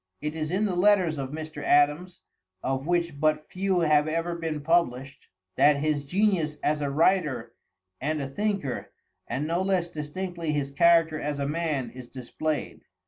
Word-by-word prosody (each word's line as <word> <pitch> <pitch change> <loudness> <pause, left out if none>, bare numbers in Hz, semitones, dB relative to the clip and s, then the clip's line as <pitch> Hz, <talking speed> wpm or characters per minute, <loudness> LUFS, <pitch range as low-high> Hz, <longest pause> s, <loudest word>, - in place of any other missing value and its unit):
It 150 +1 -3
is 155 -1 -3
in 190 +5 +1
the 190 -4 -1
letters 180 -5 +3
of 135 -1 -3
Mr. 155 0 -6
Adams, 150 +6 +2 0.4
of 135 +2 -2
which 170 -4 0
but 155 0 +1
few 185 -1 0
have 150 -2 +3
ever 165 +2 -1
been 160 -3 -3
published, 140 -5 0 0.3
that 145 0 +6
his 145 -1 -1
genius 175 -3 +1
as 150 0 +1
a 145 - -1
writer 150 -5 +1 0.5
and 155 +3 -1
a 140 - -3
thinker, 190 - -3 0.3
and 130 +5 -2
no 170 +3 0
less 190 -3 0
distinctly 165 +1 -4
his 140 -2 -2
character 165 +1 +4
as 145 0 -2
a 140 0 -2
man, 150 -4 -2
is 125 -1 -10
displayed. 145 +5 -4
155 Hz, 165 wpm, -27 LUFS, 145-170 Hz, 0.5 s, that